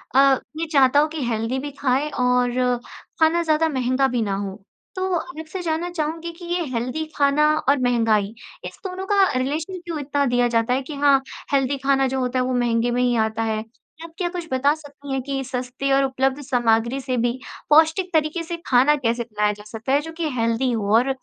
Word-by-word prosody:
अ, 275 0 +6 0.2
ये 330 - -1
चाहता 275 0 +5
हो 300 - +3
कि 310 - -3
हेल्दी 225 +3 -1
भी 290 +2 -5
खाएँ 275 +2 +1
और 250 -1 +1 0.4
खाना 325 +2 +4
ज़्यादा 320 0 +2
महँगा 260 -1 +1
भी 250 -3 -1
ना 200 -3 -1
हो, 195 -1 -4 0.4
तो 375 0 -1
आप 320 -1 -7
से 380 - -4
जानना 335 +1 -2
चाहूँगी 330 0 -3
कि 345 +1 -12
ये 350 +1 -1
हेल्दी 250 +7 -2
खाना 285 +1 +3 0.2
और 285 - +4
महँगाई, 225 -4 +2 0.3
इस - - -8
दोनों 375 0 -4
का 400 -1 +4
रिलेशन 310 +8 -2
क्यों 335 -3 -4
इतना 285 0 0
दिया 245 -1 +2
जाता 230 0 +1
है 265 - +1
कि 290 +3 -7
हाँ, 280 -1 +4 0.3
हेल्दी 275 0 +2
खाना 270 0 +2
जो 265 +1 -2
होता 255 0 -1
है, 255 - +1
वो 255 - -1
महँगे 240 -1 +1
में 245 +1 0
ही 245 -1 +2
आता 220 +1 -2
है। 220 -1 -1 0.4
आप 330 -1 -10
क्या 355 - -1
कुछ 350 -1 -6
बता 270 +3 +3
सकती 285 -2 -11
हैं 265 - -1
कि 270 0 -3
सस्ती 255 +1 -3
और 275 0 +4
उपलब्ध 265 +1 0
सामग्री 240 -1 +1
से 255 -1 -2
भी 240 +2 0 0.3
पौष्टिक 320 +5 +4
तरीके 315 +2 +1
से 340 +1 -5
खाना 265 +4 +5
कैसे 235 -3 -1
बनाया 210 -2 0
जा 210 0 -12
सकता 225 +3 -5
है, 285 - +4
जो 325 +2 -8
कि 325 -1 -2
हेल्दी 230 +3 +1
हो 210 -3 -1
और 250 +3 +2
270 Hz, 210 wpm, -22 LUFS, 245-310 Hz, 0.4 s, अ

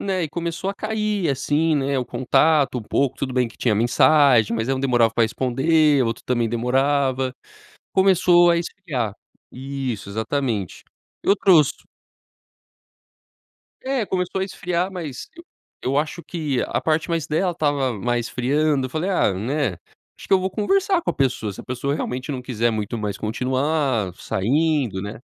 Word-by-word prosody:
né, 190 -2 -1
e - - -4
começou 170 +4 -3
a - - -7
cair, 215 -3 -1
assim, 145 +4 +1
né, 140 -1 0
o 125 - -1
contato 135 +3 +2
um - - -6
pouco, 135 +4 0
tudo 135 - -3
tudo - - -6
bem 125 -2 +2
que - - -18
tinha 115 -4 +1
mensagem, 125 +1 +4
mas 115 +1 -2
ela 135 -1 0
demorava 120 -4 +3
pra 115 - +2
responder, 135 +5 +2
o - - 0
outro 115 0 -3
também 120 -2 0
demorava, 130 +2 0 0.6
começou 180 -2 +5
a 170 - +3
esfriar. 165 - -3 0.4
Isso, 130 -5 -5
exatamente. 110 -1 -3 0.4
Eu 200 - +4
trouxe 165 -7 +4 2.1
É, 265 -3 0
começou 185 -1 -2
a - - +1
esfriar, 180 -1 -2
mas 165 -8 -7
eu 340 - -12 0.4
eu 135 +2 -1
acho 155 +3 -2
que 150 -7 -2
a - - -1
parte 160 0 0
mais 165 -2 -2
dela 175 +4 +1
estava 145 -5 0
mais 120 +2 -1
esfriando, 140 +2 0
eu - - -11
falei: 160 +7 -2
"Ah, 180 - +2
né, 115 +3 -1 0.4
acho - - -11
que - - -3
eu 190 - +3
vou 190 +1 -2
conversar 380 - +1
com 340 - -1
a - - -3
pessoa, 125 -6 -1
se - - -9
a - - -13
pessoa 130 +3 -2
realmente 130 0 -4
não 130 -2 -5
quiser 120 -2 0
muito 110 +1 -3
mais 105 -2 -3
continuar 130 - -1
saindo, 135 0 0
né". 100 +3 -7
140 Hz, 170 wpm, -22 LUFS, 120-165 Hz, 2.1 s, começou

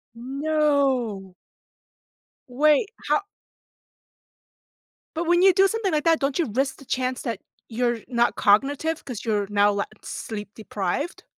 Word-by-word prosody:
No. 265 -7 0 1.1
Wait, 295 - +3 0.2
how - - +3 1.9
But 335 +1 -2
when 350 +1 +4
you 380 -1 +6
do 390 +1 +5
something 430 -3 -1
like 300 -1 0
that, 330 -1 +4
don't 275 -1 -1
you 300 -11 0
risk 270 +2 0
the 275 - -15
chance 255 0 -2
that 230 -6 -3 0.3
you're 240 0 -1
not 240 -1 +1
cognitive 285 +10 +2
'cause 245 -6 -7
you're 205 -3 0
now 205 0 +3
la 200 0 -1 0.2
sleep 210 -2 -6
deprived? 215 - -4
260 Hz, 130 wpm, -24 LUFS, 220-305 Hz, 1.9 s, you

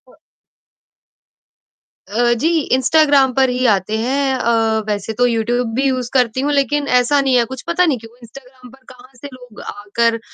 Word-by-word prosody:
अ - - -21 2.0
अ, 240 +3 +1
जी 240 +8 0 0.3
Instagram 275 0 +3
पर 265 +1 +2
ही 250 +1 -1
आते 200 +3 -2
हैं 265 +4 -1
अ, 225 -3 +1
वैसे 210 +1 -3
तो 245 +3 +1
यूट्यूब 235 0 -1
भी 265 - 0
यूज़ 255 -2 -2
करती 250 -1 +1
हूँ 290 +2 -1
लेकिन 285 +1 0
ऐसा 280 +4 +1
नहीं 265 -2 +1
है 240 - +3
कुछ, 260 +2 -8
पता 340 +1 +2
नहीं 300 -6 0
क्यों 225 +1 -15
इंस्टाग्राम 250 +1 -15
पर 265 0 -20
कहाँ 255 0 -16
से 245 +4 -10
लोग 245 -4 -14
आकर 230 +3 -2
250 Hz, 175 wpm, -17 LUFS, 230-270 Hz, 2.0 s, इंस्टाग्राम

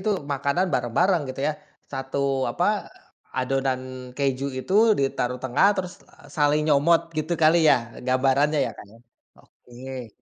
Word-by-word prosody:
itu 210 +3 -1 0.2
makanan 140 +7 0
bareng-bareng 170 - +1
gitu 130 +1 -6
ya, - - 0 0.4
satu 135 +1 -4 0.3
apa, - - -1 0.7
adonan 130 0 0 0.4
keju 135 -1 -1
itu 160 +8 -5 0.3
ditaruh 125 -2 -1
tengah 130 +9 +3
terus, 180 -1 -3 0.2
eee, 150 - -19
saling 150 0 +3
nyomot. 155 +3 +4 0.2
Gitu 155 +3 -2
kali 160 +2 +6
ya - - +7 0.3
gambarannya 135 +4 +2
ya - - -4
Kak, - - -11
ya? - - -16 0.5
Oke. 125 0 -10
140 Hz, 140 wpm, -24 LUFS, 130-155 Hz, 0.7 s, ya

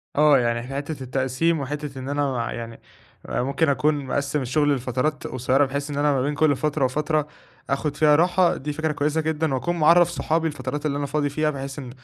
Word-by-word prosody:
آه، 150 -1 +6
يعني 120 -1 0
في 135 - -7
حتةّ 145 0 -4
التقسيم 130 +6 0
وحتةّ 145 -1 -5
إن 130 - -6
أنا 135 -5 -1
يعني 115 -1 -7 0.5
ممكن 140 +5 0
أكون 145 +1 +1
مقسِّم 140 +2 -1
الشغل 145 +3 +1
لفترات 130 +4 -2
قصيرّة 130 +3 +1
بحيث 140 +2 -4
إن 145 - -4
أنا 145 0 +3
ما 135 - +1
بين 145 +3 -1
كُلّ 145 -1 +3
فترة 150 0 0
وفترة 150 +3 0 0.4
آخد 140 +1 -1
فيها 150 0 +5
راحة، 175 +2 +3
دي 150 +2 -4
فكرة 160 +1 -1
كويسة 150 +2 0
جدًا 160 -1 -1
وأَكُون 175 +7 -1
معرّف 170 +2 +6
صحابي 165 -1 0
الفترات 150 -1 -4
اللي 140 -2 0
أنا 145 - -2
فاضي 145 +1 -1
فيها 155 +2 0
بحيث 135 -1 -5
إن 130 -3 -7
145 Hz, 200 wpm, -23 LUFS, 135-155 Hz, 0.5 s, آه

